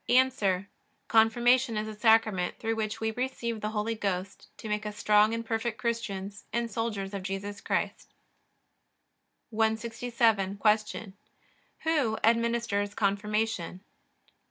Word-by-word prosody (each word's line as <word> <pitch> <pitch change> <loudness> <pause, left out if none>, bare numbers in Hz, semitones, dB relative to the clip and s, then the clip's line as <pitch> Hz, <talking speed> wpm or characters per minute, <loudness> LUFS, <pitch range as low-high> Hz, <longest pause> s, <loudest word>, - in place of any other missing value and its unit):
A. 240 -7 +3 0.4
Confirmation 235 +2 +4
is 215 0 -2
a 215 - -5
Sacrament 215 -4 +3
through 225 0 -1
which 215 -1 -2
we 220 0 0
receive 235 -2 -3
the 210 - -1
Holy 215 +1 -1
Ghost 195 -3 -4
to - - -8
make 210 0 -1
us 210 -1 -6
strong 210 +1 +4
and 230 0 -3
perfect 225 0 -2
Christians 205 -3 -3
and 235 -1 -1
soldiers 205 -3 -3
of 200 - -3
Jesus 195 +2 -5
Christ. - - -2 1.4
167. 225 -2 +1
Q. 210 -1 +1 0.7
Who 290 -9 +1
administers 230 -3 +1
Confirmation? 205 -2 -1
220 Hz, 120 wpm, -29 LUFS, 205-230 Hz, 1.4 s, Confirmation